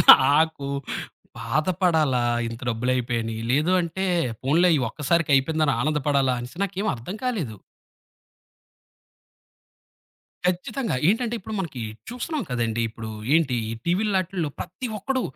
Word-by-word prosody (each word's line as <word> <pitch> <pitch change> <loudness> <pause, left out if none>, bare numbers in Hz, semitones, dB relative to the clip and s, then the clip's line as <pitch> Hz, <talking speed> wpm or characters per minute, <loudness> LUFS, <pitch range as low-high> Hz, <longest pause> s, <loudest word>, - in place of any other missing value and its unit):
నాకు 145 +1 +5 0.7
బాధపడాలా 155 -2 +1 0.3
ఇంత 115 0 -7
డబ్బులయిపోయాని, 120 -1 0 0.2
లేదు 150 +8 +3
అంటే 175 +3 -2 0.4
పోనిలే 160 +7 +4
ఈ - - +2
ఒక్కసారికయిపోయిందని 150 +1 +2
ఆనందపడాలా 140 -2 +2
అనేసి 125 +10 -8
నాకేమర్థం 195 - -2
కాలేదు. 175 - -2 2.9
ఖచ్చితంగా. 185 - -1
ఏంటంటే 230 +2 +1
ఇప్పుడు 220 +2 -7
మనకి 135 -10 -4 0.3
చూస్తున్నాం 280 +5 -3
కదండీ, 115 -2 0
ఇప్పుడు 110 0 -7 0.2
ఏంటి 155 -6 +3 0.2
ఈ - - -3
టీవీలాటిల్లో 185 -3 0
ప్రతి 215 +9 -5
ఒక్కడు 260 +5 -1
155 Hz, 100 wpm, -24 LUFS, 130-185 Hz, 2.9 s, నాకు